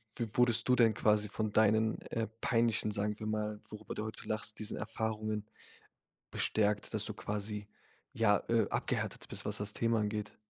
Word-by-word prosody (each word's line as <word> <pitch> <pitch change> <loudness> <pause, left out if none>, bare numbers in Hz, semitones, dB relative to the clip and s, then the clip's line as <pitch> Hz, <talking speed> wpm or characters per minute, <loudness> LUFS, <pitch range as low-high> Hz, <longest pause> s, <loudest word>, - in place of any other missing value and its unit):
w 115 - -2
wurdest 120 -2 +4
du 125 - +6
denn 115 -3 +5
quasi 105 -1 +2
von 110 +1 -2
deinen, 110 0 +3
äh, 115 -1 -3
peinlichen 115 -2 +2
sagen 105 0 -1
wir 110 - -5
mal, 105 -1 -2
worüber 105 - -8
du 105 - -3
heute 110 - -8
lachst, 110 0 -2
diesen 110 - -3
Erfahrungen 110 -1 -3 0.9
bestärkt, 105 -1 0
dass - - +3
du - - -3
quasi, 105 0 -3 0.4
ja, 105 -2 +3
äh, 115 -3 +3
abgehärtet - - -2
bist, - - 0
was - - +3
das 105 +1 +1
Thema 115 -1 +1
angeht? 105 0 -3
110 Hz, 170 wpm, -33 LUFS, 105-110 Hz, 0.9 s, du